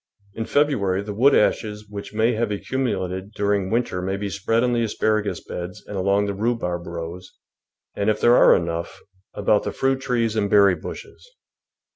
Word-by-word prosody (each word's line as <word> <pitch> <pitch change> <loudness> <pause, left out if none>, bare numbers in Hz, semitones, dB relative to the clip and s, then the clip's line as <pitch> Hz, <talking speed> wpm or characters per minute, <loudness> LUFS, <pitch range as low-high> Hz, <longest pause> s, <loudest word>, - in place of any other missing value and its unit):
In 115 - -4
February 105 -11 +1
the 105 0 -5
wood 135 +7 +4
ashes 105 -1 0
which 100 -1 -8
may 110 +3 +2
have 115 -1 -1
ac 100 - -4
cumulated 95 -6 -2
during 100 -2 0
winter 115 -5 -1
may 95 +2 -2
be 100 0 -4
spread 115 +4 0
on 125 -1 +1
the 120 - +1
asparagus 110 -1 -1
beds 90 +4 -7
and 105 - -7
along 100 +2 +1
the 100 - -2
rhubarb 95 -5 -2
rows, 85 +2 -7 0.6
and, 100 +1 0
if 110 - +1
there 120 +1 +5
are - - +7
enough, 85 0 -3 0.4
about 105 0 +2
the - - -3
fruit 135 0 0
trees 120 -4 0
and 105 -2 0
berry 100 -2 +6
bushes. - - -9
105 Hz, 180 wpm, -23 LUFS, 95-115 Hz, 0.6 s, are